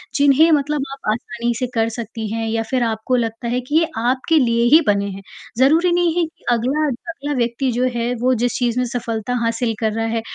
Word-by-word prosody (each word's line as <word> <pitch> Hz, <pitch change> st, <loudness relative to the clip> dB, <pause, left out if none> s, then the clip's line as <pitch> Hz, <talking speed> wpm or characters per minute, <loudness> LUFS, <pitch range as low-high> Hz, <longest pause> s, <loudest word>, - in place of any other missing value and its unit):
जिन्हें 285 Hz, +3 st, +5 dB
मतलब 290 Hz, -1 st, 0 dB
आप 270 Hz, -6 st, -5 dB
आसानी 235 Hz, +1 st, -2 dB
से 250 Hz, -, -1 dB
कर 225 Hz, 0 st, +2 dB
सकती 225 Hz, -1 st, -6 dB
हैं 225 Hz, 0 st, -2 dB
या 225 Hz, 0 st, -1 dB
फिर 255 Hz, -2 st, +1 dB
आपको 225 Hz, +2 st, -1 dB
लगता 230 Hz, 0 st, -3 dB
है 250 Hz, +2 st, -1 dB
कि 290 Hz, +5 st, -4 dB
ये 330 Hz, -, +1 dB
आपके 260 Hz, +7 st, +1 dB
लिए 235 Hz, -2 st, +2 dB
ही 330 Hz, -, +7 dB
बने 200 Hz, -1 st, +2 dB
हैं। 195 Hz, +1 st, -8 dB, 0.4 s
ज़रूरी 325 Hz, +7 st, +4 dB
नहीं 350 Hz, -2 st, +2 dB
है -, -, +3 dB
कि 320 Hz, -, -16 dB
अगला 265 Hz, +7 st, 0 dB
अगला 290 Hz, +2 st, -5 dB
व्यक्ति 240 Hz, +2 st, 0 dB
जो 245 Hz, +2 st, 0 dB
है 235 Hz, +1 st, -1 dB
वो 255 Hz, +1 st, +3 dB
जिस 245 Hz, -, 0 dB
चीज़ 245 Hz, 0 st, 0 dB
में 250 Hz, -, +1 dB
सफलता 230 Hz, 0 st, -3 dB
हासिल 230 Hz, 0 st, 0 dB
कर 220 Hz, -1 st, 0 dB
रहा 225 Hz, 0 st, -1 dB
है, 225 Hz, 0 st, -1 dB
245 Hz, 220 wpm, -19 LUFS, 230-275 Hz, 0.4 s, ही